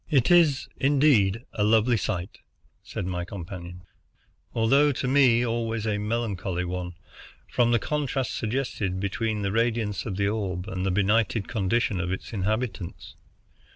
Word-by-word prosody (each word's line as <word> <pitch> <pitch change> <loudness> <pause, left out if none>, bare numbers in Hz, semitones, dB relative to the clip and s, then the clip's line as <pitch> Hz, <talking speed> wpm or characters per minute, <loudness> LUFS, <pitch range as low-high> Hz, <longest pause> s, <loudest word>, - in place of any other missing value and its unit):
"It 140 -1 +3
is, 160 -6 +4
indeed, 130 -6 +3
a 105 - 0
lovely 110 +3 +4
sight," 95 -3 -3 0.4
said - - -5
my 90 -1 -2
companion, 90 -1 -8 0.7
"although 135 +6 +3
to 130 -1 -3
me 125 -3 +4
always 115 -1 -2
a 105 -1 0
melancholy 105 -5 -2
one, 90 -1 -4 0.5
from 120 -1 +2
the 120 - +4
contrast 140 -2 -2
suggested 110 -5 -2
between 105 +2 -2
the 100 - 0
radiance 115 -1 0
of 95 -4 -4
the 100 0 +1
orb 100 -3 -2
and 95 -4 -3
the 95 - +1
benighted 105 +2 +1
condition 105 -1 0
of 90 0 -2
its 95 - -5
inhabitants. 105 -2 -3
110 Hz, 145 wpm, -26 LUFS, 95-120 Hz, 0.7 s, is